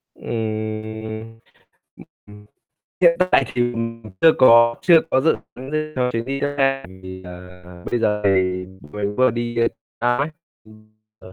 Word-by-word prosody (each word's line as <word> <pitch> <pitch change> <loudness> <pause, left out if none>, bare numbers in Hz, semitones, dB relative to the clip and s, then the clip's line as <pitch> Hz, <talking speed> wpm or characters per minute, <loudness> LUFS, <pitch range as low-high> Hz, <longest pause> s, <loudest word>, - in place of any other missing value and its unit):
Ừm, 110 0 -5 0.6
ừm, - - -14 0.2
ừm. 105 0 -15 0.6
Hiện 170 -1 +5
tại 135 - +4
thì, 120 0 +1
ừm, 115 0 -4 0.2
chưa 160 - +7
có 115 -2 +7
chưa 170 -3 +6
có 130 - +3
dự 160 - +2 0.2
tính 130 +2 -9
gì 155 0 0
cho 125 -1 +1
chuyến 115 0 -2
đi 135 +1 -4
xa, 135 -1 0
ừm, 95 0 -14
thì 95 - -8
giờ 90 0 -12
bây 120 - +1
giờ 105 -1 +1
thì 90 -1 +1 0.3
mình 105 0 -3
vừa 130 -1 +4
đi 120 0 -4 0.4
xa 120 +1 +2
ấy, 140 +4 0 0.4
ừm, 110 0 -19 0.3
ờ. 95 - -14
115 Hz, 165 wpm, -21 LUFS, 105-130 Hz, 0.6 s, chưa